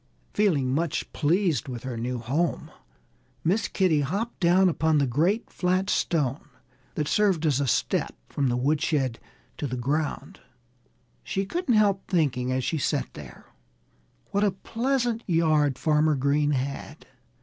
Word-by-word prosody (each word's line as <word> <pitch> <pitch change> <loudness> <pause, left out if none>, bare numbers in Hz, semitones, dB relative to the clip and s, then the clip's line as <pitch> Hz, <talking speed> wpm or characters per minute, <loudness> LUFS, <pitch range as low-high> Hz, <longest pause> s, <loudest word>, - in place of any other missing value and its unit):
Feeling 150 -12 +2
much 160 +1 -2
pleased 165 - +1
with 125 -3 -6
her 130 -2 -4
new 120 +2 -3
home, 135 +9 -2 0.7
Miss 195 +7 +1
Kitty 175 -6 +2
hopped 200 - -3
down 185 +2 +4
upon 160 -2 +2
the 140 - +3
great 165 - 0
flat 185 +2 0
stone 145 -5 0 0.5
that 150 -2 -1
served 190 -5 +2
as 145 -4 +2
a 140 - 0
step 115 - 0
from 140 -2 -1
the 120 - 0
woodshed 140 -2 0 0.4
to 145 - -3
the 125 -1 -4
ground. 145 +5 -2 0.8
She 195 - -2
couldn't 320 - 0
help 200 -2 +2
thinking, 130 -8 0
as 130 0 0
she 160 +5 -1
sat 145 +1 -1
there, 65 -5 -11 0.9
what 200 +1 +1
a 205 - +4
pleasant 235 +4 -1
yard 155 -6 +2
Farmer 155 0 +2
Green 140 +2 +1
had. 140 +2 -3
155 Hz, 145 wpm, -26 LUFS, 135-190 Hz, 0.9 s, down